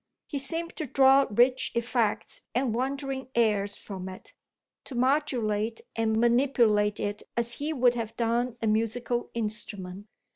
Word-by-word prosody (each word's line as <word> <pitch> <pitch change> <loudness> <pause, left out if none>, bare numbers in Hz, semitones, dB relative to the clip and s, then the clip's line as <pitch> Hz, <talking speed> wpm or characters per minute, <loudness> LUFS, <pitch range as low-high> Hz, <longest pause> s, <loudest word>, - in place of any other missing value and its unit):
He 285 - -4
seemed 335 +5 -3
to 310 - -3
draw 270 +2 +5
rich 245 +5 +3
effects 235 -2 -1
and 250 -2 +1
wandering 265 +1 -3
airs 210 -3 +2
from 190 -2 -7
it 185 - -11 0.5
to 265 - -8
modulate 240 -5 +1 0.2
and 220 -1 +1
manipulate 235 -4 +3
it 205 0 -3 0.2
as 235 0 +2
he 295 +5 -3
would 250 -5 +3
have 230 -2 -5
done 235 +1 0
a - - +2
musical 230 +2 0
instrument. 205 -3 -5
235 Hz, 140 wpm, -28 LUFS, 215-265 Hz, 0.5 s, draw